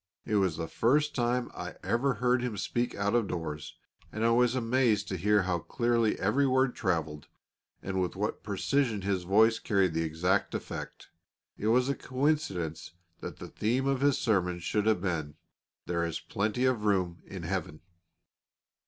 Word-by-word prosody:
It 110 -2 +1
was 95 -5 +1
the 80 - -3
first 150 - +2
time 120 0 0
I - - -6
ever 130 +2 +1
heard 125 +3 +2
him 120 -4 -3
speak 120 +5 -1
out 100 +1 0
of 120 -4 +2
doors, 80 -4 -5 0.4
and 110 +1 -1
I 115 - +4
was 120 +1 +3
amazed 115 -4 +2
to 95 - -2
hear 105 +3 +3
how 90 -2 0
clearly 115 +4 +1
every 130 +9 +2
word 130 -1 +2
travelled, 80 -6 -2 0.6
and 95 -1 -1
with 90 - -2
what 105 +3 -2
precision 110 +1 0
his 95 -2 0
voice 110 +4 +4
carried 95 -5 +1
the 80 - 0
exact 85 +5 0
effect. - - -6 0.5
It 105 - -3
was 125 +3 +4
a 140 - +1
coincidence 125 - -2 0.3
that - - -7
the - - -8
theme 120 +5 0
of 135 -1 +1
his 140 -1 +3
sermon 90 -8 +1
should 105 +4 -1
have 110 -5 +3
been, 80 -6 -2 0.5
"There 85 -1 -1
is 85 -1 -2
plenty 110 +5 -1
of 125 -5 +1
room 90 -4 0
in 95 -3 -7
Heaven." 80 -3 -3
105 Hz, 170 wpm, -30 LUFS, 90-125 Hz, 0.6 s, I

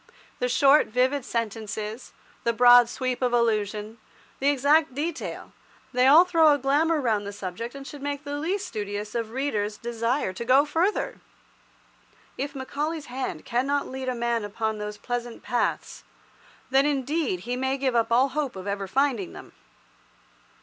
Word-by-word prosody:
The 250 - 0
short, 275 +4 +5
vivid 255 +4 +1
sentences, 220 -1 -4 0.3
the 235 - +1
broad 245 0 +7
sweep 255 0 -3
of 250 -1 +1
allusion, 215 -1 0 0.4
the 275 - 0
exact 285 +1 +3
detail, 325 +3 -4 0.4
they 250 +1 +4
all 315 +6 +8
throw 330 -4 +5
a 290 - +4
glamour 295 +4 +2
round 215 -6 0
the - - -4
subject 205 +5 -6
and 275 0 -8
should 285 0 -9
make 285 0 -4
the 290 0 -4
least 370 +6 -2
studious 205 0 -5
of 230 -2 -2
readers 220 -5 -2
desire 235 -1 -1
to 185 - -5
go 260 +4 +5
further. 370 +10 -1 1.1
If 280 +1 -4
Macaulay's 290 +1 -4
hand 255 -12 -4
cannot 275 +4 0
lead 260 0 -4
a 250 - -2
man 235 -1 -1
upon 215 +1 -3
those 210 0 -5
pleasant 240 +1 -5
paths, 245 - -2 0.7
then, 270 +2 +4
indeed, 280 - -1
he 245 +5 -3
may 265 +1 -1
give 260 -2 0
up 230 0 +1
all 255 +4 +4
hope 285 -3 -2
of 190 0 -7
ever 200 -1 -3
finding 250 -4 0
them. - - -11
250 Hz, 160 wpm, -26 LUFS, 225-285 Hz, 1.1 s, all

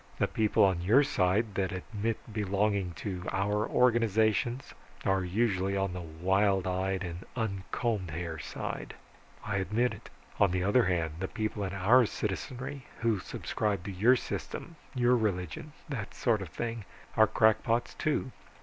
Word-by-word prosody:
The - - +2
people 110 -1 +2
on 95 -3 +3
your 115 +11 +5
side 105 -4 +1
that 95 -1 0
admit 105 +4 -3 0.2
belonging 100 -2 0
to 95 -4 -4
our 105 +2 0
organizations, 115 0 +2 0.3
are 95 -1 +2
usually 100 0 +1
on 95 -2 0
the 90 - -5
wild 95 +4 +1
eyed 95 +1 -1
and 85 0 -6
uncombed 105 -2 -2
hair 80 0 -4
side - - -5 0.5
I 105 -2 -1
admit 105 +6 +1
it. - - -11 0.3
On 100 - +5
the 90 0 0
other 105 +5 +4
hand, 80 -3 0
the 95 - -2
people 110 -1 -3
in 95 - -4
our 110 +6 +5
citizenry 125 +7 -4
who 115 -3 +2
subscribe 100 0 -2
to 100 - -5
your 110 +8 +5
system, 165 +6 -5 0.2
your 125 0 +4
religion, 100 - -2 0.2
that 120 -9 -5
sort 115 -4 +1
of 95 - -6
thing, 115 +5 -4 0.3
are 110 0 +6
crackpots, 115 +2 +2
too. 145 -3 -1
100 Hz, 150 wpm, -30 LUFS, 95-115 Hz, 0.5 s, are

